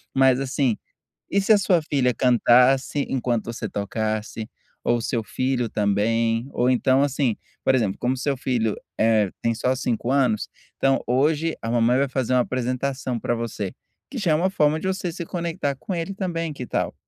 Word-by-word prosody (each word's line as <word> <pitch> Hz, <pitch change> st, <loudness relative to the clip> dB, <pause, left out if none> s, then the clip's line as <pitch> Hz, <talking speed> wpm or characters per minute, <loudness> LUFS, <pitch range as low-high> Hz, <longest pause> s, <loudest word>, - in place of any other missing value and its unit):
Mas, 130 Hz, -1 st, +4 dB
assim, 130 Hz, -3 st, 0 dB, 0.5 s
e 200 Hz, -, +3 dB
se 200 Hz, +3 st, +4 dB
a -, -, +6 dB
sua 185 Hz, -3 st, +2 dB
filha 135 Hz, -5 st, +1 dB
cantasse 125 Hz, +3 st, +3 dB
enquanto 120 Hz, -3 st, -1 dB
você 115 Hz, -2 st, -5 dB
tocasse? 110 Hz, +2 st, -3 dB, 0.3 s
Ou 120 Hz, -, +2 dB
o -, -, -4 dB
seu 115 Hz, 0 st, -1 dB
filho 130 Hz, +1 st, -1 dB
também. 115 Hz, +4 st, +1 dB
Ou 125 Hz, +1 st, +1 dB
então, 130 Hz, +1 st, +3 dB
assim, 140 Hz, -4 st, +1 dB, 0.3 s
por 130 Hz, -, +3 dB
exemplo, 110 Hz, -7 st, 0 dB
como 125 Hz, +2 st, 0 dB
seu 140 Hz, +1 st, -1 dB
filho, 120 Hz, -4 st, 0 dB, 0.2 s
eh, 110 Hz, -2 st, +3 dB
tem 115 Hz, -, +1 dB
só 125 Hz, +3 st, 0 dB
5, 120 Hz, -1 st, -1 dB
anos, 130 Hz, -6 st, +1 dB, 0.3 s
então: 135 Hz, 0 st, +2 dB
"Hoje 150 Hz, +6 st, +1 dB
a 115 Hz, -, -3 dB
mamãe 120 Hz, +1 st, +3 dB
vai 140 Hz, +1 st, +2 dB
fazer 130 Hz, -1 st, -1 dB
uma 125 Hz, -, +4 dB
apresentação 130 Hz, 0 st, -2 dB
pra 120 Hz, -, -1 dB
você." 110 Hz, -4 st, -4 dB, 0.4 s
Que 270 Hz, -, -7 dB
já 195 Hz, -8 st, +1 dB
é -, -, +4 dB
uma 175 Hz, +5 st, +2 dB
forma 155 Hz, -4 st, +2 dB
de 190 Hz, -, -3 dB
você 185 Hz, -2 st, -2 dB
se 170 Hz, +1 st, -6 dB
conectar 170 Hz, -4 st, -2 dB
com 185 Hz, -, -6 dB
ele 170 Hz, +2 st, -3 dB
também, 165 Hz, -5 st, -3 dB
que 130 Hz, -3 st, -6 dB
tal? -, -, -2 dB
130 Hz, 185 wpm, -23 LUFS, 115-145 Hz, 0.5 s, a